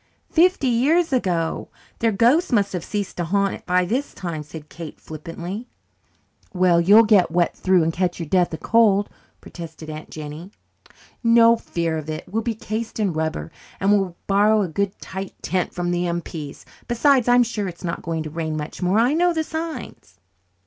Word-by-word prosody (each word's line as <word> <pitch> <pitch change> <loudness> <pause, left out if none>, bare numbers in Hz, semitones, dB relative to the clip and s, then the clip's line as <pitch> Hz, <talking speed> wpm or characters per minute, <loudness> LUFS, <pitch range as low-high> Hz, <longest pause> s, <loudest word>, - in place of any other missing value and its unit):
"Fifty 355 -2 +3
years 285 +7 +2
ago! 175 -9 -1 0.3
Their 225 -1 +2
ghosts 245 - +3
must 200 -5 +2
have 180 -3 -3
ceased 205 -2 -4
to 175 - -1
haunt 200 +3 +1
it - - -10
by 180 0 +3
this 255 +10 -2
time," 170 -5 -4
said 150 0 -10
Kate 160 0 -9
flippantly. 170 +8 -7 0.9
"Well, 180 -2 +4
you'll 205 +6 +7
get 205 -4 +4
wet 175 +1 +1
through 185 -2 +3
and 165 +1 0
catch 180 0 -1
your 165 - -4
deaths 175 0 +2
of - - -12
cold," 210 -3 +3 0.3
protested 160 -2 -9
Aunt 155 0 -8
Jennie. 155 +3 -8 0.7
"No 230 0 +6
fear 170 -7 -2
of 155 0 -8
it. 155 0 -4
We'll 225 +3 -1
be 230 0 -2
cased 220 +1 -5
in 200 -5 +1
rubber. 155 - -3 0.3
And 195 +1 +2
we'll 195 -4 +1
borrow 210 +2 +3
a - - -1
good 195 +4 -2
tight 190 0 -6
tent 185 -1 -1
from 175 0 -2
the 175 0 0
M.P.s. 165 -4 -5 0.2
Besides, 250 +1 +3
I'm 245 0 +6
sure 215 -4 -3
it's 175 0 -9
not 170 -2 -3
going 165 -1 -3
to 155 - -7
rain 160 -1 -3
much 150 +4 -6
more. 180 +3 +2
I 240 +5 +3
know 350 +2 +3
the 320 - +1
signs." 315 - -6
185 Hz, 185 wpm, -22 LUFS, 165-230 Hz, 0.9 s, you'll